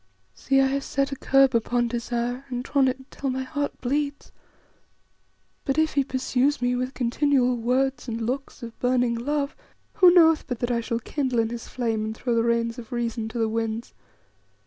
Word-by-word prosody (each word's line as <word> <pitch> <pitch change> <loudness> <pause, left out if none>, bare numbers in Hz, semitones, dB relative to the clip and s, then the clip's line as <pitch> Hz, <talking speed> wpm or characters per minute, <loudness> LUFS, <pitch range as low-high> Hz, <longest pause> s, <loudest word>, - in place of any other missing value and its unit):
See, 270 0 +1
I 270 - +5
have 275 +1 0
set 275 0 -1
a - - -2
curb 270 0 +4
upon 240 +1 +1
desire 240 +2 -2
and 245 -1 -3
drawn 275 0 +2
it 260 0 0
until 270 +1 -6
my 260 0 -2
heart 285 +1 -3
bleeds; 285 +3 -2 1.3
but 275 0 -1
if 315 0 +2
he 280 - +3
pursues 260 +2 0
me 245 0 +1
with 255 +1 -3
continual 255 0 +2
words 250 +2 0
and 230 -1 -3
looks 250 +3 -4
of 230 -1 -9
burning 245 -1 +2
love, 280 +4 -2 0.4
who 365 -3 +7
knoweth 325 -3 +5
but 245 - -3
that 240 +1 -2
I 235 -1 +1
shall 230 0 -2
kindle 260 0 -2
in 225 -1 +2
his 235 -1 -6
flame 225 -3 -2
and 220 0 -4
throw 245 - -1
the 230 - +3
reins 235 +1 0
of 230 -2 -11
reason 235 -2 -2
to 225 - -6
the 225 -1 +1
winds? 225 +1 -3
250 Hz, 190 wpm, -25 LUFS, 235-275 Hz, 1.3 s, who